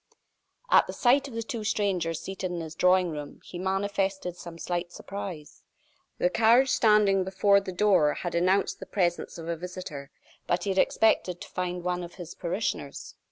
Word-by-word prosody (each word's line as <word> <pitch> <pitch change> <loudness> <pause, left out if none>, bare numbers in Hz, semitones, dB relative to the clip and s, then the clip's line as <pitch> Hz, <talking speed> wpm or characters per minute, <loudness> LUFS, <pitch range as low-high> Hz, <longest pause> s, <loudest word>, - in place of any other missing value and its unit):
At - - +6
the - - -5
sight 270 +3 +3
of 250 - -10
the 230 - -2
two 230 -2 -5
strangers 180 -6 0
seated 190 0 -5
in 175 -1 -4
his 160 -1 -7
drawing 180 +1 +3
room, 150 -2 -7
he 175 - -8
manifested 195 -1 -1
some 170 -2 -10
slight 175 0 -3
surprise. 180 -6 -8 0.6
The - - +2
carriage 235 +6 +4
standing 210 -3 +4
before 200 +2 +3
the 195 - -6
door 185 -6 +3
had 175 - -4
announced 185 +3 +1
the - - -8
presence 175 -3 -1
of 165 -1 -8
a 170 - -1
visitor; 175 -5 -7 0.4
but 175 0 0
he 200 - 0
had 190 - +1
expected 185 -5 +2
to - - -9
find 180 -1 -3
one 180 0 -1
of 175 - -9
his 175 -2 -8
parishioners. 170 -5 -4
185 Hz, 180 wpm, -27 LUFS, 175-200 Hz, 0.6 s, At